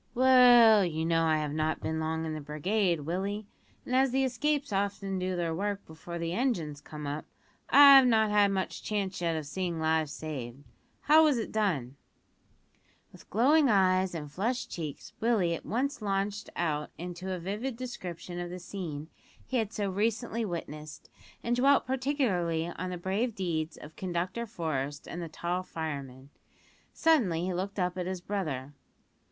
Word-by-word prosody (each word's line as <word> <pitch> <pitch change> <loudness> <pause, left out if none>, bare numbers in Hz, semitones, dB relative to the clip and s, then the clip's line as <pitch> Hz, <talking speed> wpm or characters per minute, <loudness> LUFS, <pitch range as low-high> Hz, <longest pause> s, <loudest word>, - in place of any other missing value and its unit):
"Well, 245 -4 +7
you 160 -2 -1
know 165 0 +2
I 160 -1 +3
have 150 -1 -2
not 155 +1 0
been 160 0 -2
long 160 0 -2
in 160 - -3
the 155 - -5
brigade, 170 +4 0
Willie, 195 +7 -3 0.4
and 255 - -1
as 265 +1 +4
the 265 +2 +1
escapes 280 +1 0
often 195 -1 -1
do 185 0 -1
their 170 -2 -1
work 200 +3 -2
before 160 +2 -8
the 170 0 -3
engines 175 - -1
come 150 0 -8
up, 145 +2 -3 0.5
I've 275 -2 +9
not 220 -3 +3
had 205 -1 +5
much 190 -1 -2
chance 200 -4 -2
yet 165 -1 0
of 155 -2 -3
seeing 170 +2 -3
lives 160 -1 +1
saved. 140 -4 -6 0.4
How 310 +2 +6
was 295 -5 +4
it 225 - -3
done?" 150 - -1 1.1
With - - -17
glowing 280 +6 +4
eyes 185 -3 +3
and 150 -3 -6
flushed 230 - -2
cheeks 155 -5 -6
Willie 215 -7 +2
at 165 - -6
once 265 +3 -1
launched 200 0 -2
out 150 -3 -1
into 180 +3 -6
a 185 - -2
vivid 210 +8 -4
description 180 -8 -6
of 175 0 -4
the 180 - -6
scene 170 -5 -6 0.4
he 260 - -1
had 220 -3 -1
so 205 -3 -2
recently 225 +3 -1
witnessed, 155 -5 -7 0.3
and 240 +1 +1
dwelt 275 +3 +4
particularly 245 - 0
on 180 +1 -5
the 180 - -4
brave 200 +6 -1
deeds 165 -4 -2
of 150 - -12
Conductor 185 +5 -3
Forest 145 - -3
and 175 - -6
the 165 - -5
tall 175 +3 -2
fireman. 140 -6 -6 0.6
Suddenly 225 - +2
he 185 - -1
looked 195 +3 -3
up 180 -1 -1
at 180 - -2
his 185 -1 -3
brother. 155 -9 -4
185 Hz, 170 wpm, -29 LUFS, 160-220 Hz, 1.1 s, I've